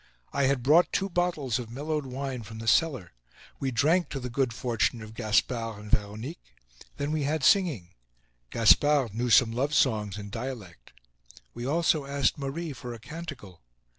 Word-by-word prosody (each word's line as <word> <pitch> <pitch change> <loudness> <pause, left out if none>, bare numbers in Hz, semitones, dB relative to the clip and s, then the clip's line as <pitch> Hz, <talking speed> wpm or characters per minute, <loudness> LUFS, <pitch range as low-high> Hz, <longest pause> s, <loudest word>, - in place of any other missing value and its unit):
I 140 -1 +2
had 135 -2 +1
brought 155 +7 +5
two 195 0 -1
bottles 170 -10 0
of 120 -2 -7
mellowed 145 +3 -3
wine 130 -1 -4
from 110 +1 -10
the 115 0 -7
cellar. 120 - +2 0.5
We 135 - -1
drank 150 +8 +2
to 135 - -4
the 125 -1 -6
good 130 0 0
fortune 115 -2 -1
of 110 0 -10
Gaspard 115 0 0
and 105 0 -10
Veronique. 110 +10 -3 0.4
Then 145 +1 -2
we 155 -1 0
had 145 +1 -1
singing. 150 - +3 0.6
Gaspard 130 +1 +4
knew 120 +3 -1
some 115 0 +6
love 140 +6 -1
songs 105 -7 +1
in 100 -1 -8
dialect. 110 - -7 0.6
We 120 +1 -5
also 155 -1 +2
asked 140 0 0
Marie 145 +3 -4
for 125 -2 -7
a - - -11
canticle. 145 - -9
130 Hz, 165 wpm, -28 LUFS, 110-145 Hz, 0.6 s, some